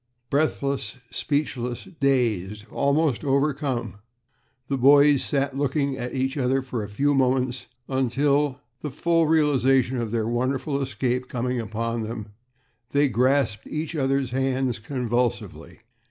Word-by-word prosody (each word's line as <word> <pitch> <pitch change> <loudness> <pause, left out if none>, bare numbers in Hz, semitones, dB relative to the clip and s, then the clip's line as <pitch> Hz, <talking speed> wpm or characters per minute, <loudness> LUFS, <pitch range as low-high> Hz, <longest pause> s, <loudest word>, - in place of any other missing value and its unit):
Breathless, 140 -5 0 0.2
speechless, 130 -5 -2
dazed, 110 -7 0
almost 140 -1 +1
overcome, 135 -6 0 0.7
the 140 - 0
boys 140 +2 +6
sat 140 -1 -1
looking 140 0 0
at 125 0 -5
each 135 +2 -1
other 135 0 +1
for 125 -4 -4
a 105 - -7
few 140 +8 +1
moments, 130 -1 +1 0.2
until, 140 +2 +1 0.2
the 150 - -4
full 165 +3 +1
realization 135 -5 +3
of 115 -2 -2
their 110 -1 -1
wonderful 130 +4 -1
escape 125 -1 -1
coming 125 0 -2
upon 115 +2 -3
them, 110 -1 -5 0.6
they 145 0 +3
grasped 125 -2 +1
each 155 +2 -4
other's 135 -3 0
hands 130 -2 0
convulsively. 120 -1 -2
130 Hz, 125 wpm, -24 LUFS, 120-140 Hz, 0.7 s, boys